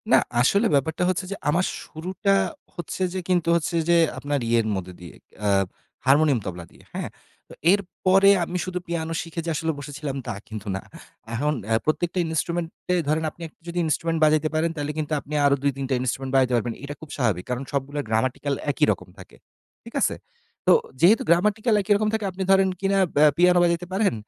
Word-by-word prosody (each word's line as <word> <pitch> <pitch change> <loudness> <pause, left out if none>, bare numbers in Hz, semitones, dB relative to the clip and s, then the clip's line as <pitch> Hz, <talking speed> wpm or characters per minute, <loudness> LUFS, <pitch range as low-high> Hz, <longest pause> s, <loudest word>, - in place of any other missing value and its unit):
না, - - +8 0.2
আসলে 200 - +3
ব্যাপারটা 145 +5 +1
হচ্ছে 185 -1 -1
যে - - -2
আমার 175 +5 +2 0.2
শুরুটা 185 +5 -2 0.4
হচ্ছে 175 +2 -6
যে 190 - -2
কিন্তু 175 -2 +2
হচ্ছে 170 0 -1
যে 170 - +6 0.2
আপনার 145 0 -1
ইয়ের 115 -1 +2
মধ্যে 90 -1 -5
দিয়ে 85 -3 -11 0.3
আ - - +2 0.6
হারমোনিয়াম, 140 -1 +4
তবলা 90 -2 -6
দিয়ে, - - -19
হ্যা? - - -3 0.4
তো - - -11 0.2
এরপরে 195 0 +3
আমি 175 +2 -3
শুধু 180 -1 -3
পিয়ানো 165 -1 -2
শিখে 165 0 -6
যে - - -2
আসলে 160 +1 0
বসেছিলাম 145 0 -5
তা 120 - -2
কিন্তু 110 -2 -8
না। 95 - -4 0.5
এখন 145 +6 0 0.3
প্রত্যেকটা 170 +3 0
ইনস্ট্রুমেন্ট 165 +1 -1 0.2
এ - - +3
ধরেন 155 +2 +1
আপনি 170 - -19
একটা 155 - -24
যদি 170 +1 -5
ইন্সট্রুমেন্ট 165 +1 0
বাজাইতে 155 0 +3
পারেন 160 +2 +2
তাইলে 145 0 -2
কিন্তু 155 0 -2
আপনি 145 +2 -10
আরও 140 0 +5
২ 140 - +3
৩ 135 - -3
টা - - +1
ইনস্ট্রুমেন্ট 130 +1 -2
বাজাতে 130 -1 +3
পারবেন। 120 0 -1
এটা 140 +1 -5
খুব 160 - -11
স্বাভাবিক। 110 -9 0
কারণ 125 +1 -2
সবগুলা 140 +1 -2
গ্রামাটিক্যাল 130 +5 0 0.2
একই 150 +2 +2
রকম 90 - -5
থাকে। 90 - -14 0.5
ঠিক - - -12
আছে? - - +2 0.5
তো - - +5 0.3
যেহেতু 200 +7 +6
গ্রামাটিক্যাল 210 +6 +3
একই 205 +1 +2
রকম 210 +1 +1
থাকে 220 -2 -1
আপনি 190 +1 -4
ধরেন 190 0 +5
কিনা 195 0 +2 0.2
বে 145 - +5
পিয়ানো 180 0 +5
বাজাইতে 170 0 +1
পারেন, 200 - +2
155 Hz, 195 wpm, -24 LUFS, 135-180 Hz, 0.6 s, না